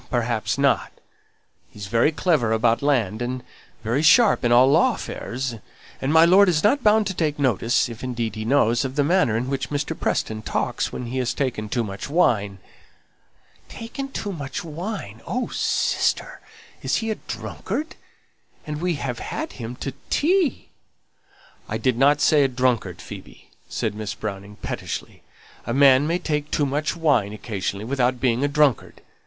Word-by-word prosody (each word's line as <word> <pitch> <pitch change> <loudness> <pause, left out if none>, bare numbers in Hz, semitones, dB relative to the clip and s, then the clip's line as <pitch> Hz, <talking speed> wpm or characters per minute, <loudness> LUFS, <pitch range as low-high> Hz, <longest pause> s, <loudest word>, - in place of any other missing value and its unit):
perhaps 115 -3 -1
not. 140 0 +2 0.8
He's 105 -2 -9
very 115 - +2
clever 155 -8 +1
about 115 +1 +2
land, 120 -7 +1
and 125 +1 -3 0.4
very 120 +6 0
sharp 195 - +5
in 120 - +2
all 120 +2 +7
law 165 - +4
affairs; 125 -1 -5 0.4
and 135 - 0
my 160 +1 +7
lord 190 +3 +6
isn't 210 - +2
bound 215 0 +4
to 190 - -2
take 155 -4 -1
notice 120 -4 +1
if 120 +1 -9
indeed 120 -3 -3
he 110 0 -5
knows 120 -1 +2
of 135 0 -4
the 145 - +2
manner 150 - +2
in 120 +2 -2
which 135 -1 -3
Mr. 145 +2 -2
Preston 110 -7 -2
talks - - -2
when 125 - -5
he 125 +2 -3
has 125 -2 -1
taken 120 -6 -2
too 120 +2 0
much 100 +1 -6
wine." 105 - +2 1.1
"Taken 250 +4 -6
too 205 -5 -4
much 140 -2 -5
wine! 165 - -6
Oh, 250 +1 -2
sister, - - 0 0.4
is - - 0
he 225 -1 -1
a - - -1
drunkard? 310 +2 -5 0.7
and 150 0 -5
we 180 -1 0
have 130 -4 -4
had - - -4
him 120 0 -7
to 135 +1 -5 0.2
tea!" 345 0 +1 1.0
"I - - -1
didn't 135 +3 +3
say 155 - +4
he 145 - +6
was 130 - -11
a - - -17
drunkard, 125 -3 0
Phoebe," - - -12 0.2
said - - -2
Miss 105 -1 -5
Browning, 100 -1 -6
pettishly. - - -5 0.5
"A 120 - -1
man 140 0 +6
may 170 +2 +1
take 150 -3 -2
too 145 - +1
much 150 +4 -1
wine 140 -11 +1
occasionally, 105 -1 -4
without 125 0 0
being 125 0 +1
a - - +3
drunkard. 145 -3 +1
130 Hz, 170 wpm, -23 LUFS, 115-155 Hz, 1.1 s, all